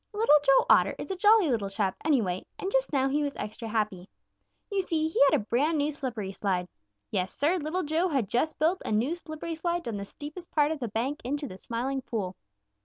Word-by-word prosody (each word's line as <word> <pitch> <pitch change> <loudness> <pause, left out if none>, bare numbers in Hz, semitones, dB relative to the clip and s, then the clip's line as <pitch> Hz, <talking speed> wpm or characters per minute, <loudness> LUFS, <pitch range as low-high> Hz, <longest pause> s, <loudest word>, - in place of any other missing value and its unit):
Little 430 -7 +4
Joe 275 -2 +5
Otter - - +5
is - - -6
a - - -1
jolly 410 -4 +5
little 210 -5 0
chap, 195 -1 -1
anyway, 220 - +1
and 385 - -3
just - - +1
now 270 -2 +2
he 290 +2 +1
was 285 -1 -2
extra 215 +2 -6
happy. 210 -4 -2 0.6
You 395 -1 +1
see, 320 -4 0
he 320 - 0
had - - +3
a - - -5
brand 290 +9 +1
new 295 +1 +1
slippery 245 -9 -4
slide. 185 -3 -1 0.4
Yes, 185 +1 -1
Sir, 320 +6 +2
Little 345 +3 -2
Joe 320 +4 +1
had 270 - 0
just 250 +9 0
built 335 +4 +1
a - - -3
new 230 +9 +1
slippery 335 -1 -6
slide 340 +2 -2
down 225 -8 -4
the 200 - -5
steepest 305 - -9
part 295 0 +2
of 315 - -3
the 240 - -2
bank 245 +8 -2
into 285 +4 -2
the 185 -5 -10
Smiling 260 +5 -2
Pool. 200 -7 -4
285 Hz, 220 wpm, -28 LUFS, 220-320 Hz, 0.6 s, Joe